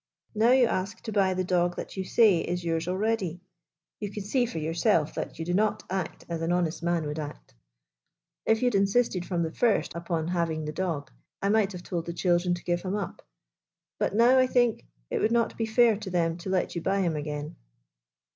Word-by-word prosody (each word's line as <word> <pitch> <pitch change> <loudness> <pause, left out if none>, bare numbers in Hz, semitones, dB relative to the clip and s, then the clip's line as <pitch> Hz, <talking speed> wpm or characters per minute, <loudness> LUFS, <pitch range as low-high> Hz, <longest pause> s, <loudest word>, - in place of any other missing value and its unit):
Now 220 +2 +3
you 255 0 +6
ask 190 -3 -2
to 220 - -6
buy 195 -3 +2
the 185 - 0
dog 175 -1 +1
that - - -7
you 190 - -2
say 200 -2 +4
is 175 +1 -3
yours 165 0 -1
already. 190 -2 -1 0.6
You 205 - -3
can 205 0 -6
see 245 +4 +1
for 165 - -6
yourself 160 -1 +1
that - - -5
you 165 - -4
do 175 - -1
not 210 +2 +1
act 185 -3 -3
as 170 -1 -4
an 165 +1 0
honest 175 -2 0
man 170 -2 0
would 150 +1 -4
act. 150 -1 -8 0.9
If 225 +2 +2
you - - +3
had 245 - +2
insisted 195 -2 +2
from 175 -3 0
the 160 - -2
first 230 +4 +1
upon 170 -1 -2
having 165 -3 -1
the 150 - -3
dog, 165 -4 -3 0.3
I 200 - 0
might 210 -2 +3
have 180 -1 -8
told 170 -2 -4
the 170 - -3
children 175 0 +1
to 175 - -10
give 175 0 0
him 190 +2 -2
up. 200 -4 -4 0.8
But - - 0
now 245 +4 +6
I 255 - +4
think 245 - +1 0.2
it - - 0
would 220 - +2
not 235 -1 +1
be 225 - -2
fair 225 0 +4
to 210 -2 -6
them 170 -2 +1
to 180 +2 -7
let 185 -1 0
you 170 - -3
buy 195 +3 +1
him 170 -4 0
again." 150 0 -4
180 Hz, 220 wpm, -27 LUFS, 170-210 Hz, 0.9 s, you